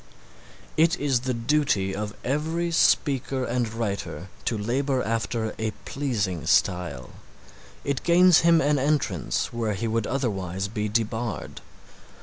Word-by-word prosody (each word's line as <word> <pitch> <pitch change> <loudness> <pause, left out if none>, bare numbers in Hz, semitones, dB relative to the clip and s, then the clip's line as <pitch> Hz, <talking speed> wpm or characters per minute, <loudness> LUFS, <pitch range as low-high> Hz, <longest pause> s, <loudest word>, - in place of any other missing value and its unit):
It 165 +2 +4
is 140 -4 +2
the 130 +1 -2
duty 115 -6 +1
of 105 0 -4
every 160 +5 -1
speaker 135 -5 +2
and 120 -2 -1
writer 100 -4 -4 0.2
to 115 - 0
labor 130 +5 0
after 115 0 -2
a 110 0 0 0.2
pleasing 105 - -2
style. 85 -9 +1 0.7
It 140 -2 -1
gains 175 0 +6
him 165 -1 +5
an 145 0 +2
entrance 135 - 0
where 115 -3 -1
he 115 +5 -2
would 115 -1 0
otherwise 95 -8 -2
be 105 0 -3
debarred. 110 0 -2
120 Hz, 130 wpm, -25 LUFS, 105-140 Hz, 0.7 s, gains